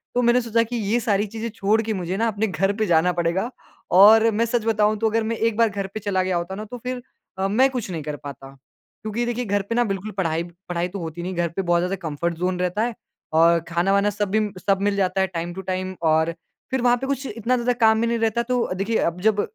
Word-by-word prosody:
तो 245 - +3
मैंने 240 +1 +4
सोचा 230 -1 +1
कि 235 +2 -5
ये 220 +2 0
सारी 205 -2 +1
चीज़ें 225 +2 -5
छोड़ 220 +1 +2
के 220 0 -2
मुझे 185 0 -3
ना 230 +2 +1
अपने 220 +1 -1
घर 195 +1 0
पे 220 - +1
जाना 170 +1 +3
पड़ेगा 175 +6 0 0.5
और 220 +4 +8
मैं 225 +2 +1
सच 230 -1 -1
बताऊँ 215 -1 +2
तो 225 -1 +2
अगर 225 +1 0
मैं 225 +1 -1
एक 225 -1 0
बार 230 -1 +4
घर 200 -1 -4
पे 215 - -4
चला 195 -2 0
गया 185 -1 0
होता 170 +3 -4
ना 215 +2 -6
तो 245 +4 -8
फिर 250 +1 -5 0.4
अ, 190 - +1
मैं 250 +7 +4
कुछ 250 -6 -4
नहीं 160 -4 -4
कर 150 -1 -4
पाता। 135 -1 -9 0.5
क्योंकि 220 +3 -2
देखिए 240 +1 -2
घर 205 -1 +1
पे 230 - 0
ना 240 - +3
बिल्कुल 195 0 -3
पढ़ाई 165 -3 0 0.3
पढ़ाई 175 0 -1
तो 195 +1 -6
होती 165 0 -6
नहीं, 185 +1 -4
घर 170 -1 0
पे 170 - -3
बहुत 175 -2 +2
ज़्यादा 180 +2 -1
कम्फर्ट 165 +3 -2
ज़ोन 180 +1 -1
रहता 180 +4 0
है। 235 -1 -2 0.4
और 165 +1 +5
खाना-वाना 195 +4 +2
सबी 205 +1 0 0.2
सब 195 0 +1
मिल 205 0 +1
जाता 190 -1 +1
है 190 - +2
टाइम 175 -1 -4
टू 190 - -6
टाइम 185 0 -3
और 160 +1 +2 0.4
फिर 265 -2 0
वहाँ 245 0 +4
पे 265 - -4
कुछ 275 0 -2
इतना 230 +3 -1
ज़्यादा 245 +1 +1
काम 220 -1 +4
भी 235 - +1
नहीं 235 0 0
रहता। 225 +1 +1
तो 245 -5 -1
देखिए 200 +4 0
अब 180 +2 -12
जब 210 -1 +3
205 Hz, 255 wpm, -23 LUFS, 180-230 Hz, 0.5 s, और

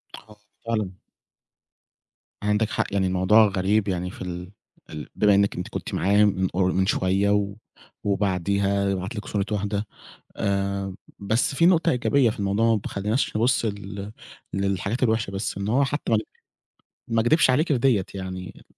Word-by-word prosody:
آه 105 - -15 0.3
فعلًا. 110 -5 -1 1.5
عندِك 105 +1 +1
حق، - - 0
يعني 95 -1 +2
الموضوع 95 +4 +5
غريب 100 +1 +1
يعني 90 -1 -2
في - - -12
ال 90 0 -6 0.4
ال 75 -2 -7
بما 105 -1 +4
إنِك 100 0 +2
أنتِ 90 - -4
كنتِ - - -6
معاه 100 +3 +3
مِن 95 -2 +1
قر 90 +1 +1
مِن 95 +1 +1
شوية 95 0 +1
و 100 -1 +1 0.5
وبعديها 100 0 0
يبعت 95 +4 -3
لِك 105 - -5
صورة 100 -2 -1
واحدة. 105 0 -1 0.5
آآ 100 -1 -1 0.2
بس 110 +7 0
في 170 - +3
نُقطة 175 -2 +4
إيجابية 125 0 +2
في 110 - -6
الموضوع 105 +3 +2
ما - - -1
تخليناش 105 +7 -1
نبص 120 +1 +2
لل 100 -1 -5 0.4
للحاجات 100 +5 -1
الوحشة 110 -4 +1
بس، 95 0 -3
إن 100 +1 -3
هو 125 +6 +3
حتى 145 -2 -3
ما 110 - +5 0.9
ما 115 0 +2
كدِبش 135 +4 +4
عليكِ 150 +6 +2
في 145 - +2
ديّة 115 -6 +2
يعني. 95 -1 -7
100 Hz, 160 wpm, -24 LUFS, 95-110 Hz, 1.5 s, الموضوع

